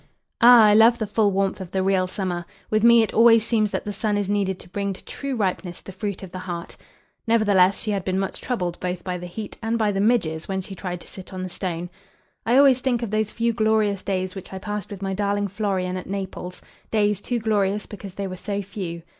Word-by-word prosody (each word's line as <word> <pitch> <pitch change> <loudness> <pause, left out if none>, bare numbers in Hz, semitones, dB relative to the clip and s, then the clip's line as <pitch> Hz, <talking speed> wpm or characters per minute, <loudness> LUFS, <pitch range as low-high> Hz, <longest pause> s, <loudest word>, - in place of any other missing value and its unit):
"Ah, 240 -1 +9
I 210 -1 +6
love 225 +2 +6
the 220 - -2
full 210 0 +2
warmth 195 0 0
of 185 - -7
the 190 +1 -1
real 190 -1 +2
summer. 180 -2 -3 0.3
With 215 0 +2
me 235 -1 +7
it 220 - -3
always 230 -1 +6
seems 215 -3 +1
that - - -3
the 205 - -3
sun 210 0 -1
is 205 -2 -1
needed 200 -2 0
to 175 - -13
bring 200 +1 -2
to - - -13
true 275 -2 -4
ripeness 185 -4 -2
the - - -10
fruit 195 +1 -5
of 185 - -9
the 185 - -6
heart." 175 -2 -6 0.5
Nevertheless 200 -4 +4
she 215 - -1
had 200 -2 -1
been 185 0 -1
much 195 0 -3
troubled 180 -9 -2
both 180 -1 -3
by 180 -1 -3
the 180 - -7
heat 210 +4 -7
and 225 +1 0
by 215 -2 +2
the 195 0 -1
midges 180 -8 +1
when 190 -1 -2
she 190 +1 -7
tried 180 -2 -5
to - - -12
sit 190 0 -10
on 185 -1 -5
the 185 - -4
stone. 175 -1 -4 0.6
"I 240 +3 +4
always 270 -2 +6
think 245 -3 0
of 220 - -4
those 215 0 0
few 235 +1 0
glorious 215 -3 +1
days 185 -1 -2
which 190 - -9
I 190 - -5
passed 210 +1 -5
with 200 -1 -7
my 195 0 -1
darling 205 +1 0
Florian 190 -2 -2
at 180 - -7
Naples; 190 -2 -5 0.3
days 210 -2 +1
too 245 - -2
glorious 210 -2 0
because 195 -2 -9
they 200 - -3
were 185 -1 -5
so 200 +1 -3
few." 175 -4 -6
200 Hz, 240 wpm, -23 LUFS, 185-215 Hz, 0.6 s, Ah